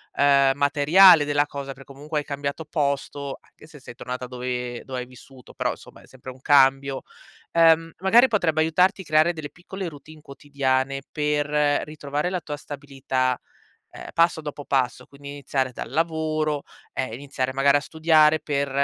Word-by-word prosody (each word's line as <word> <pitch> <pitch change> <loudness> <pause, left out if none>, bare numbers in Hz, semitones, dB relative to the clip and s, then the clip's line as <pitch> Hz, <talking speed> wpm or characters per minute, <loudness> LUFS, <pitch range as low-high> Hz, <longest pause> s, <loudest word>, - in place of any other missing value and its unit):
uhm, 140 -1 +4
materiale 150 +4 +6
della 145 0 +1
cosa 140 -1 -6
per 135 +1 -15
comunque 150 +3 -5
hai 145 - -7
cambiato 140 +2 -4
posto, 140 -2 -3
anche - - -20
se 155 -2 -15
sei 120 -2 -12
tornata 125 0 -6
dove 125 -1 -5
dove 130 -1 -5
hai 125 - -5
vissuto, 125 0 -16
però, - - -1
somma, - - -16
è - - -18
sempre 130 0 -11
un 130 0 -17
cambio. 135 -1 +3 0.5
Ehm, 165 0 +4
magari 230 +7 +5
potrebbe 165 -9 +1
aiutarti 180 +5 +2
creare 155 +2 +3
delle 155 -3 -7
piccole 185 +1 -7
routine 155 0 -12
quotidiane 135 -1 -2
per 150 -1 0 0.4
ritrovare 150 +2 -3
la 180 -2 -2
tua 150 -1 -6
stabilità, 135 -3 -3 0.5
ehm, - - -10
passo 165 -1 +2
dopo 145 -1 -7
passo, 125 -2 -1
quindi 140 0 -12
iniziare 135 -2 -2
dal - - -7
lavoro, 155 -2 -1 0.3
eh, 130 -4 -3
iniziare 130 -1 -4
magari 140 +1 +4
a - - 0
studiare 155 0 +3
per, 140 -2 -2
145 Hz, 160 wpm, -24 LUFS, 135-155 Hz, 0.5 s, materiale